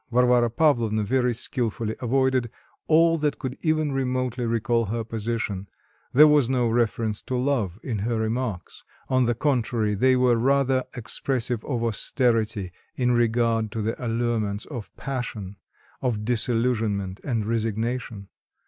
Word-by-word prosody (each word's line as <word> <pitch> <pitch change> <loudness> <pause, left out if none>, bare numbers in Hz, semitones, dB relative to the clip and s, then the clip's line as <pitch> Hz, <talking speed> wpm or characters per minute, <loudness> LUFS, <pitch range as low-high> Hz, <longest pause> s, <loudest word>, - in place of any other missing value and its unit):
Varvara 125 -1 +4
Pavlovna 115 -5 +2
very 125 +3 +1
skilfully 115 -2 -2
avoided 130 -1 +1 0.4
all 165 +1 +4
that 150 -1 0
could 130 -2 -4
even 155 -2 +1
remotely 130 -2 -1
recall 115 0 +1
her 115 +3 -2
position; 110 -3 -3 0.4
there 150 +4 +8
was 150 -5 +4
no 125 -2 +2
reference 115 -2 0
to 130 - -4
love 125 -9 0
in 115 -5 -3
her 115 +3 -1
remarks; 110 -3 -3 0.3
on 130 -1 +3
the 120 - +1
contrary, 120 -5 0
they 130 +6 +3
were 125 -2 +3
rather 135 +1 +2
expressive 120 0 -2
of 120 -5 -2
austerity 110 -4 0 0.2
in 125 -1 +1
regard 115 -2 +1
to 110 - -4
the 110 +1 -1
allurements 115 -3 -1
of 120 -8 -7
passion, 115 -7 -5 0.4
of 115 -5 -1
disillusionment 115 -5 0
and 115 -6 -1
resignation. 115 -1 -2
120 Hz, 135 wpm, -25 LUFS, 110-130 Hz, 0.4 s, there